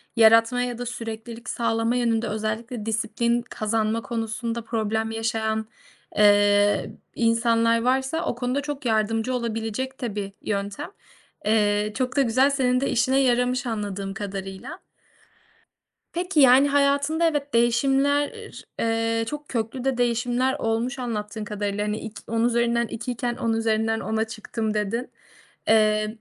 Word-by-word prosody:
yaratma 230 +2 +5
ya 245 -1 -2
da 245 - -5
süreklilik 230 0 -6
sağlama 230 0 0
yönünde 235 -2 +1
özellikle 215 +2 -3
disiplin 235 +2 0
kazanma 220 -1 -1
konusunda 230 0 -3
problem 220 0 -1
yaşayan, 220 -1 -1 0.5
eee, 205 0 +4 0.2
insanlar 230 0 +2
varsa 265 +6 0
o - - -1
konuda 250 +3 -1
çok 290 -2 -6
yardımcı 225 +2 +1
olabilecek 235 +2 -3
de 235 -5 -3
bir 200 -1 -4
yöntem. 205 - -3 0.5
Eee, 210 -1 +2
çok 255 +1 -2
da 280 - +4
güzel, 260 +2 +3
senin 255 -2 +1
de 275 - 0
işine 260 +3 +2
yaramış 250 -1 +2
anladığım 200 -4 -3
kadarıyla. 195 - -6 1.3
Peki, 350 -1 0
yani, 265 +1 +7
hayatında 285 +3 +2
evet, 290 -3 -2
değişimler, 270 +5 +2 0.5
ııı, 225 0 0
çok 295 +5 -6
köklü 235 +1 -3
de 265 -2 0
değişimler 245 +2 +1
olmuş 230 +4 -1
anlattığın 215 -3 -4
kadarıyla. 205 0 -2
Hani, 210 +1 -2
ik 220 -1 -8
"10 230 +1 +1
üzerinden 235 0 +1
2'yken, 240 +1 -3
10 230 -2 -1
üzerinden 225 0 +1
10'a 220 0 -1
çıktım." 220 0 -4
dedin. 215 +4 -2 0.6
Eee, 215 0 +3
230 Hz, 130 wpm, -24 LUFS, 220-250 Hz, 1.3 s, yani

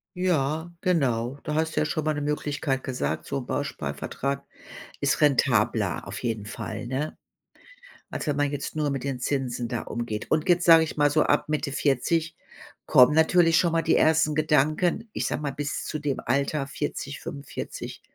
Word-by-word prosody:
Ja, 160 -3 0
genau. 130 -7 +1
Da 150 -2 -2
hast 160 0 0
du - - +5
ja - - +2
schon 155 +1 -2
mal 155 0 +1
'ne 145 - -3
Möglichkeit 145 -2 -1
gesagt, 80 - -2
so - - -3
'n 130 - -5
Bausparvertrag 140 - -3 0.5
ist 140 -2 +1
rentabler 115 - +2
auf - - -6
jeden 115 -4 -2
Fall, 110 +1 -6
ne? 135 +5 -3 0.9
Als - - -4
wenn 150 -3 0
man 145 0 +1
jetzt 145 +1 -4
nur 150 -1 0
mit 135 -3 -3
den 135 -2 -3
Zinsen 125 -3 -2
da 115 -1 -3
umgeht. 115 -2 -4
Und 155 +3 +1
jetzt 175 0 +4
sage 165 -1 +8
ich 155 - -5
mal 145 -1 +4
so 155 +2 +3
ab - - +2
Mitte 150 -1 -1
40 155 +4 0 0.5
kommen 125 +3 +7
natürlich 165 +1 +4
schon 170 -2 +2
mal 165 - +3
die 160 - +3
ersten 155 -1 +3
Gedanken, 155 +7 +1
ich - - -1
sage - - -2
mal, 140 - -1
bis 145 +2 -3
zu 155 - -3
dem 145 -3 -2
Alter 140 +3 0
40, 140 0 -4
45, 140 0 -7
145 Hz, 180 wpm, -26 LUFS, 130-155 Hz, 0.9 s, sage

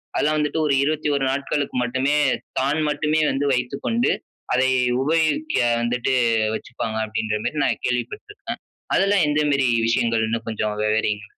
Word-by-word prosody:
அதெல்லாம் 155 +1 +1
வந்துட்டு 150 +2 -1
1 140 - +2
21 145 -1 0
நாட்களுக்கு 140 +1 -2
மட்டுமே 130 +4 0 0.5
தான் 140 +4 +1
மட்டுமே 150 +1 +1
வந்து 135 +2 -1
வைத்துக்கொண்டு, 140 - 0 0.4
அதை 130 +1 +3 0.3
உபயோகிக்க 165 - +1 0.2
வந்துட்டு 125 +2 0 0.4
வச்சுப்பாங்க, 110 -2 -5
அப்டின்ற 110 0 -2
மேரி, 155 - -2
நான் - - -1
கேள்வி 125 -1 +1
பட்டுருக்கேன். 415 -1 -8 0.3
அதெல்லாம் 195 -1 +3
எந்த 150 +1 +1
மேரி 140 -2 +2 0.2
விஷயங்கள்ன்னு 115 -1 0
கொஞ்சம் 110 -1 -2
விவரிங்க. 105 -1 0
135 Hz, 130 wpm, -22 LUFS, 115-150 Hz, 0.5 s, அதை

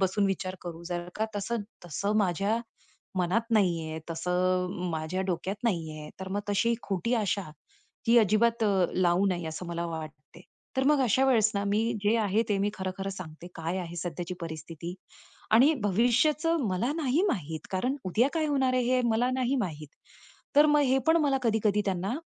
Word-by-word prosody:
बसून 195 +2 +2
विचार 185 -1 -2
करू. 170 -1 -7
जर 175 0 -4
का 220 - +1
तसं 215 +3 -2 0.2
तसं 200 +6 -1
माझ्या 200 +3 +1 0.6
मनात 195 +7 0
नाहीये. 170 -7 +1
तसं 180 +2 0
अ, 180 -1 -4
माझ्या 160 +3 -2
डोक्यात 185 +3 -2
नाहीये. 160 -8 -2
तर 190 - -5
मग 200 +2 -1
तशी 215 +4 +2
खोटी 200 +5 -1
आशा 205 -3 0 0.7
ही 235 - +6
अजिबात 230 +2 +3
अ, 195 -4 +3
लावू 180 +1 +3
नये 175 -3 -1
असं 160 +3 -6
मला 170 0 -3
वाटते. 160 -2 -8 0.4
तर 265 - +2
मग 295 -2 +3
अशा 255 +2 +3
वेळेस 225 -5 +4
ना 200 0 0
मी 205 +2 +1 0.2
जे 215 +3 +4
आहे, 215 0 +2
ते 205 -2 +1
मी 200 +1 +1
खरं, 190 0 -3
खरं 195 0 -3
सांगते. 175 -3 -9
काय 165 +3 -2
आहे 175 -1 -6
सध्याची 175 +1 -4
परिस्थिती 165 +1 -6 0.6
आणि 255 +8 +7
भविष्याचं 250 - +2
मला 200 +9 0
नाही 300 +1 +1
माहित. 160 - -3
कारण 245 +9 0
उद्या 215 +8 +2
काय 320 -2 +1
होणार 270 -3 +1
आहे? 255 - +2
हे - - +3
मला 235 +3 +2
नाही 260 +1 0
माहित. 150 -3 -8 0.7
तर 295 +1 +8
मग 295 0 +4
हे 260 0 +3
पण 320 +1 +5
मला 280 -2 +2
कधी-कधी 215 -3 +2
त्यांना, 190 +3 -1
195 Hz, 180 wpm, -28 LUFS, 175-235 Hz, 0.7 s, तर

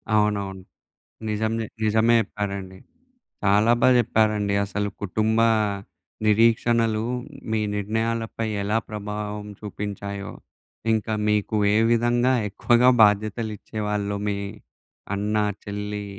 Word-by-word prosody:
అవునవును. 100 -2 0 0.7
నిజమే 110 +1 -1 0.2
నిజమే 110 +2 +4
చెప్పారండి. 100 -2 -5 0.7
చాలా 105 +3 +4
బాగా 130 - +6
చెప్పారండి. 105 -3 +1
అసలు 105 +1 -2
కుటుంబ 110 +3 0 0.9
నిరీక్షణలు 115 0 +3 0.5
మీ 110 - +1 0.2
నిర్ణయాలపై 115 +2 -2 0.2
ఎలా 105 +2 +1
ప్రభావం 105 0 -5
చూపించాయో? 100 -1 -5 0.6
ఇంకా 110 0 -1 0.2
మీకు 105 +1 0 0.2
ఏ - - +4
విధంగా 120 +2 +3 0.2
ఎక్కువగా 120 +5 +4
బాధ్యతలు 110 +2 +2
ఇచ్చే 110 - -8
వాళ్ళో 100 -1 -1
మీ 100 - 0 0.8
అన్న-చెల్లి 105 0 -2
105 Hz, 95 wpm, -24 LUFS, 105-110 Hz, 0.9 s, బాగా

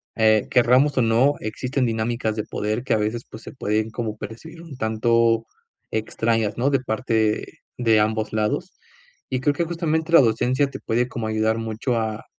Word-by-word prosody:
eh, 110 -1 +3
querramos 130 +4 +4
o - - +5
no, 120 +5 +3
existen 125 +4 -2
dinámicas 110 -1 -1
de 105 - -2
poder 110 +4 -2
que - - +1
a - - +3
veces, 110 +3 -2
pues, 110 - -11
se - - -9
pueden 110 -3 -1
como 110 -1 -4
percibir 115 +11 -9
un 160 -6 -11
tanto 115 0 +2 0.5
extrañas, 110 -1 -1
¿no?, 130 +4 +2
de 135 -2 +2
parte 110 -3 -1 0.2
de 115 -3 +3
ambos 110 0 0
lados. 110 - -1 0.6
Y 130 -1 -2
creo 145 0 +2
que 170 - -1
justamente 165 -1 -2
la 165 - +9
docencia 125 +4 +2
te - - -8
puede 120 +2 0
como 115 -2 -4
ayudar 110 +1 +1
mucho 115 +2 -2
a 110 -1 -3
115 Hz, 180 wpm, -23 LUFS, 110-130 Hz, 0.6 s, la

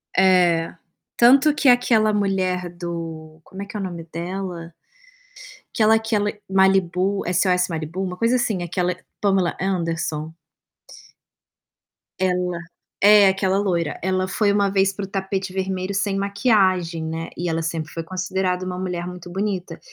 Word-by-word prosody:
É. 180 -3 +3 0.4
Tanto 270 +5 +6
que 290 -2 +3
aquela 230 -3 +4
mulher 190 -3 0
do 165 -2 -7
como 190 +4 -10
é - - -7
que 200 - -12
é - - -4
o - - -3
nome 175 -3 -5
dela? 175 -1 -5 1.0
Aquela 220 0 +4
aquela 220 -2 0 0.2
Malibu 190 0 +2
SOS 180 0 +2
Malibu, 165 +3 -4
uma 180 -1 -4
coisa 230 +5 +1
assim, 220 -7 0
aquela 180 +1 -1 0.2
Pamela 195 -4 +1
Anderson. 165 -4 -2 1.9
Ela 180 -2 0 0.4
é 205 0 +7
aquela 190 0 +1
loira. 175 -6 -1
Ela 185 0 0
foi 205 +1 +1
uma 200 -1 +2
vez 195 0 +2
para 200 - -6
o - - -10
tapete 190 0 -3
vermelho 190 0 -2
sem 200 0 0
maquiagem, 195 -5 +1
né. 160 +1 -4
E 175 0 -2
ela 165 0 -1
sempre 160 -1 -4
foi 165 - -5
considerada 185 +1 -2
um 180 0 -4
mulher 180 -2 -3
muito 180 -1 -9
bonita. 195 -1 -3
185 Hz, 145 wpm, -22 LUFS, 175-200 Hz, 1.9 s, é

